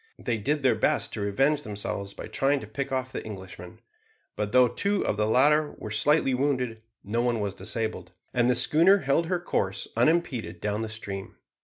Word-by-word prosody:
They 115 -2 -2
did 145 +7 -1
their 130 -3 +5
best 110 - 0
to 105 - -3
revenge 135 +9 +1
themselves 100 -3 -5
by - - -7
trying 140 +1 +1
to - - -7
pick 135 +6 -5
off 130 -1 -2
the - - -5
Englishmen; 95 -4 -10 0.5
but 105 -1 -2
though 125 0 +6
two 200 - -1
of - - 0
the 105 +1 0
latter 145 +6 +4
were 110 - -7
slightly 135 +5 +2
wounded, 125 -4 -1 0.2
no 115 +4 -1
one 120 -2 0
was 100 -2 -2
disabled, 105 -2 -4 0.2
and 120 -1 +2
the 125 - +3
schooner 170 +10 +5
held 150 +5 +2
her 180 0 0
course 100 - -2
unimpeded 125 - +1
down 105 +2 -2
the 110 - -3
stream. 100 -3 -7
120 Hz, 190 wpm, -27 LUFS, 105-140 Hz, 0.5 s, though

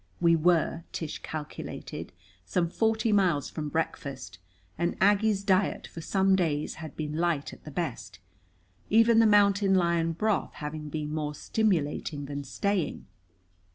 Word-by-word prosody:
We 170 -1 +5
were, 165 0 +2
Tish 160 -3 -5
calculated, 150 -10 -7 0.3
some 170 - -1
forty 220 +1 +1
miles 180 -9 +2
from 150 -2 -4
breakfast, 140 -10 -4 0.4
and 170 +1 -1
Aggie's 205 +1 +3
diet 195 -1 +1
for 165 - -9
some 190 +3 +2
days 155 -5 0
had 155 -3 -8
been 150 0 -3
light 165 -4 0
at - - -15
the - - -7
best, 150 -3 -4 0.7
even 225 +1 +5
the 225 - +6
mountain 200 -1 +4
lion 170 -2 +2
broth 215 +4 0
having 150 0 -6
been 150 0 -4
more 150 -1 -2
stimulating 150 -7 -1
than 145 0 -5
staying. 170 +5 -2
170 Hz, 140 wpm, -28 LUFS, 150-200 Hz, 0.7 s, the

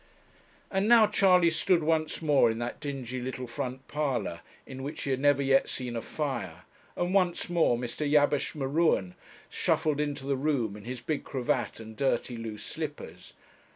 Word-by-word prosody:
And 195 +1 +1
now 230 -1 +7
Charley 185 -4 +4
stood 170 +1 +2
once 160 +1 0
more 145 -6 +4
in 110 - -2
that 120 +1 -4
dingy 130 -4 -5
little 130 0 -4
front 125 +2 -5
parlour 135 - -2 0.3
in 130 -1 -8
which 140 +3 -5
he 135 - -2
had 130 - 0
never 145 0 +3
yet 135 0 +3
seen 125 -2 -4
a 115 - -2
fire, 115 - -4 0.3
and 175 +1 -1
once 180 -3 +1
more 165 -8 +3
Mr. 125 +5 -3
Jabesh 145 0 +2
M'Ruen 140 - +1 0.3
shuffled 150 -2 0
into 145 -2 -2
the 140 0 +1
room 130 -7 0
in 105 0 -11
his 125 0 -5
big 150 +4 -2
cravat 125 -3 -2
and 110 0 -10
dirty 125 -2 0
loose 110 -2 -6
slippers. 155 -2 -7
140 Hz, 170 wpm, -29 LUFS, 120-155 Hz, 0.3 s, now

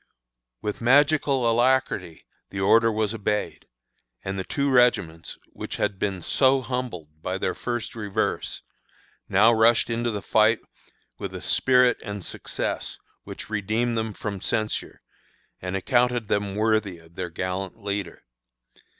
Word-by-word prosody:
With 105 +2 -3
magical 140 0 +4
alacrity 115 -8 +1 0.2
the 95 - -5
order 115 +4 +5
was 110 0 0
obeyed, 105 -1 -2 0.6
and 95 0 -3
the - - -2
two 140 +7 -1
regiments, 115 -10 +2 0.2
which - - -6
had 95 - -1
been 95 -4 -2
so 135 0 +3
humbled 100 - -5
by 90 +3 -2
their 95 - -1
first 120 -2 -4
reverse, 110 -1 -2 0.7
now 110 +5 +5
rushed 115 +1 +4
into 120 +1 0
the 105 -3 -4
fight 110 +1 +4 0.6
with - - -5
a - - -4
spirit 125 -1 +4
and 100 -2 -5
success - - -4 0.3
which - - -8
redeemed 110 +4 0
them 110 -1 -2
from 100 -2 -5
censure, 110 -1 -2 0.6
and 90 +1 -2
accounted 120 +1 +1
them 100 -1 0
worthy 110 -3 +1
of 80 0 -19
their 90 0 -4
gallant 90 +3 -4
leader. 100 -3 -4
110 Hz, 135 wpm, -25 LUFS, 95-120 Hz, 0.7 s, order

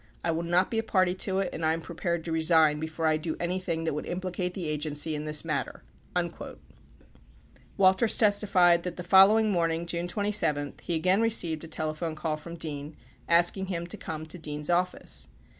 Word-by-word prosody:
I 170 - +1
will 165 +1 -1
not 175 +2 +1
be 225 - 0
a - - -1
party 185 -4 +2
to 190 +1 -2
it 190 - -3
and 165 - -5
I 160 0 +3
am 165 - -3
prepared 170 +1 -3
to 165 - -4
resign 160 -2 +3
before 160 +1 -4
I 155 -1 +3
do 155 0 -4
anything 175 -2 -2
that 160 - -1
would 150 - -5
implicate 180 0 -3
the 180 -4 -4
Agency 150 +1 -1
in 150 0 -4
this 150 +1 -1
matter. 140 -6 -3 0.3
37 170 -1 -3 1.2
Walters 190 +3 +4
testified 195 -5 +4
that 180 0 -5
the 180 - -6
following 205 +4 +6
morning, 165 -2 0
June 170 +1 -3
27, 175 -8 0
he 170 - -2
again 185 +6 +2
re 230 - +3
ceived 165 -8 0
a - - -8
telephone 155 +1 -3
call 155 0 -2
from 170 +3 -9
Dean 150 -2 -6 0.3
asking 175 +3 +3
him 170 -2 -3
to 175 - -6
come 155 -1 -6
to 165 +3 -5
Dean's 150 +1 -3
office. 180 +1 -1
170 Hz, 195 wpm, -28 LUFS, 155-185 Hz, 1.2 s, following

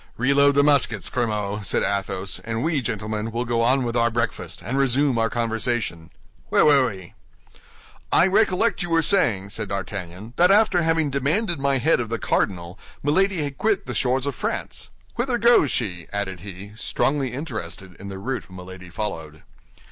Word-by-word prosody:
"Reload 140 +3 +4
the 140 - +5
muskets, 135 -8 +2
Grimaud," 105 -4 -2
said - - 0
Athos, 95 -1 -2
"and 115 +1 -3
we, 155 -4 +1
gentlemen, 110 -1 -3
will 120 +2 -2
go 120 -1 0
on 130 +3 +3
with 120 -1 -3
our 120 0 +3
breakfast, 115 0 -3
and 115 +8 -3
resume 135 -1 +2
our 115 0 +2
conversation. 115 -7 -2 0.4
Where - - +4
were 140 -4 +5
we?" 95 -4 -10 1.0
"I - - +6
recollect 200 +2 +2
you 175 - -3
were 165 -1 +3
saying," 110 - +2
said - - -2
D'Artagnan, 100 +1 -6
"that 180 +1 +5
after 200 -3 +4
having 160 -3 +1
demanded 155 - 0
my 140 0 +1
head 150 +4 +2
of 115 -2 -3
the 115 - -1
cardinal, 90 -4 -1 0.2
Milady 180 +3 +2
had 140 -2 -6
quit 215 -2 +1
the - - -5
shores 130 0 +1
of 140 - -2
France. - - -4 0.3
Whither 240 0 0
goes 235 - +5
she?" 90 -10 -2
added 95 -3 -3
he, 100 +2 -9
strongly 135 +3 -1
interested 100 - -6
in 100 - -8
the 95 -1 -6
route 125 +5 -4
Milady 90 0 -10
followed. 80 -6 -5
120 Hz, 170 wpm, -23 LUFS, 100-145 Hz, 1.0 s, I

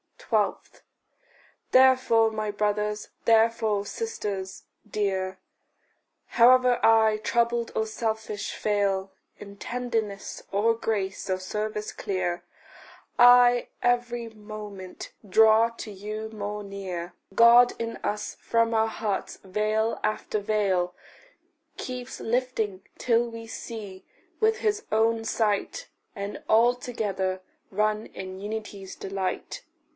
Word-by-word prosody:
12. - - -1 0.9
Therefore, 255 -4 +5
my 215 -1 -3
brothers, 210 0 -1 0.2
therefore, 220 -2 +3
sisters 205 - -4 0.3
dear, 190 -2 -1 0.9
However 250 0 +5
I, 220 -1 +5
troubled 235 +1 0
or 220 - +1
selfish, 220 -1 -3
fail 200 -2 0 0.3
In 200 0 -11
tenderness, 225 -4 -3
or 215 +4 +3
grace, 200 -4 -3
or 185 - +1
service 210 +3 -4
clear, 185 -3 -2 0.8
I 245 0 +7 0.2
every 240 -1 0
moment 210 -3 -9 0.2
draw 220 +3 +5
to 230 -2 -9
you 215 +2 -6
more 210 -1 -5
near; 185 -3 -6 0.2
God 240 +1 +7
in 230 0 -4
us 210 0 -4
from 230 0 +1
our 220 0 +3
hearts 215 -3 -3
veil 215 +3 0
after 215 0 -1
veil 195 -4 0 0.8
Keeps 250 0 -6
lifting, 225 -5 -1
till 235 0 +2
we 230 0 -9
see 210 -4 -8 0.3
with 445 0 +2
his 425 -1 0
own 225 +1 +2
sight, 220 - -1 0.3
And 200 0 -5
all 235 +2 +5
together 200 -7 -3 0.3
run 215 +2 0
in 190 0 -8
unity's 205 -2 -6
delight. 195 - -4
215 Hz, 105 wpm, -26 LUFS, 200-230 Hz, 0.9 s, I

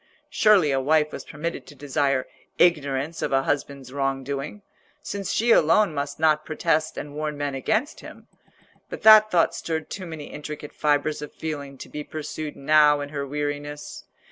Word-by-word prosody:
Surely 200 -9 +4
a 135 - +1
wife 150 +2 +2
was - - -7
permitted 160 +3 -6
to 145 - -13
desire 140 -1 0 0.3
ignorance 150 -2 +1
of - - -1
a 135 0 +2
husband's 140 -2 -3
wrong 135 -1 -1
doing, 140 +9 -5 0.4
since 200 -2 -4
she 235 +2 +2
alone 185 +1 +4
must 140 0 -4
not 155 -1 +3
protest 155 0 -1
and 145 - -6
warn 150 0 -3
men 145 -1 -2
against 220 - -1
him. - - -12 0.6
But - - -8
that 215 -1 +9
thought 175 -5 +3
stirred 160 -1 -4
too 185 -3 -6
many 160 -3 -7
intricate 150 0 -7
fibres 150 0 0
of 150 - -7
feeling 145 -3 -6
to - - -9
be 150 - -6
pursued 155 0 -6
now 150 +1 +4
in 145 - -5
her 140 -1 -4
weariness. 145 +1 -5
150 Hz, 170 wpm, -24 LUFS, 140-160 Hz, 0.6 s, that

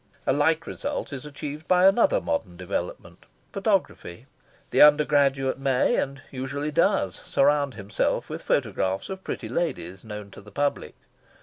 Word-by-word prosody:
A - - +3
like 155 +3 +2
result 285 - -4
is 135 +1 -6
achieved 150 +2 -7
by 180 0 +4
another 240 - +5
modern - - -3
development - - -5 0.3
photography. 195 - -1 0.5
The - - +4
undergraduate 145 -3 +4
may, 135 -2 +2
and 135 0 -3
usually 140 +3 -3
does, 160 - +2
surround 140 -2 +2
himself 100 -2 -1
with - - -6
photographs 95 +1 -1
of 190 0 -6
pretty 115 - -5
ladies 110 - -3
known 105 -2 -8
to - - -12
the 105 - -14
public. 145 +7 -2
140 Hz, 140 wpm, -25 LUFS, 125-160 Hz, 0.5 s, another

